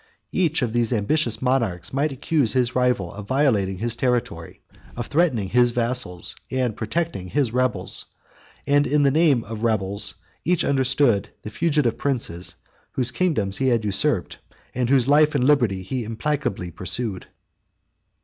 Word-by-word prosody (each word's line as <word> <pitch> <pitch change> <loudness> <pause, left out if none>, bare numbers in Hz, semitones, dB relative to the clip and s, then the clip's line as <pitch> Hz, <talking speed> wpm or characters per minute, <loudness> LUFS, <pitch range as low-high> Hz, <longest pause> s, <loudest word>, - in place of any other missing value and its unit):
Each 165 -6 +1
of 115 -3 -2
these 120 -1 +1
ambitious 120 +3 0
monarchs 115 -9 0
might 145 +3 0
accuse 135 -1 0
his 125 -2 +1
rival 125 -9 +1
of 100 0 -9
violating 110 -9 +1
his 115 +4 -2
territory, 120 -10 -2 0.4
of 120 - -3
threatening 135 - +1
his 120 +2 +4
vassals, 120 -7 -1
and 125 -4 -1
protecting 115 - -3
his 130 +1 0
rebels; 125 -1 -1 0.6
and, 145 +1 +3
by - - -3
the 145 -1 +3
name 145 -5 +3
of 110 +1 -7
rebels, 100 -3 0 0.3
each 180 0 +1
understood 130 -6 +2
the 105 - -7
fugitive 150 -2 0
princes, 115 -11 -2 0.4
whose 125 -2 +1
kingdoms 120 - 0
he 135 - 0
had 115 -4 +1
usurped, 100 -2 +1 0.3
and 125 -1 -1
whose 130 -2 +3
life 150 +1 +4
or - - +4
liberty 125 -8 +2
he 125 +6 -3
implacably 115 -5 -3
pursued. 95 +3 -2
125 Hz, 150 wpm, -23 LUFS, 105-140 Hz, 0.6 s, his